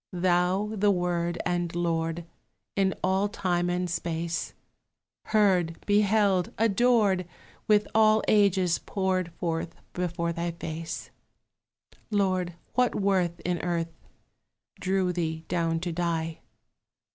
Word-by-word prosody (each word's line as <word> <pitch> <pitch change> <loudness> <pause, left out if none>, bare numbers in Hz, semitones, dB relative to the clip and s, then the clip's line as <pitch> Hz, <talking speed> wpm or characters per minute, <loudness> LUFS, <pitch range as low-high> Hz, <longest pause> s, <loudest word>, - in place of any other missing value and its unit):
Thou 180 +3 +1
the 205 -1 +2
Word 175 -2 0
and 175 -1 -1
Lord 165 -1 -1 0.5
In 195 -1 +2
all 190 +2 +2
time 175 -4 0
and 180 0 0
space 170 0 -3 0.7
Heard, 185 -6 +2
beheld, 205 -3 +3
adored, 215 -4 +3 0.4
With 210 -1 +4
all 215 0 +5
ages 190 -4 +3
poured 185 -3 -1
Forth 165 -1 -3 0.2
before 170 -1 -2
thy 170 0 -3
face, 165 -1 -6 1.0
Lord, 185 -4 0 0.2
what 250 0 +2
worth 185 -4 +1
in 175 -1 -1
earth 170 -1 -2 0.9
Drew 185 -1 +1
thee 160 -2 -3
down 165 -2 0
to 175 -1 -2
die? 165 -1 -2
180 Hz, 110 wpm, -27 LUFS, 170-195 Hz, 1.0 s, all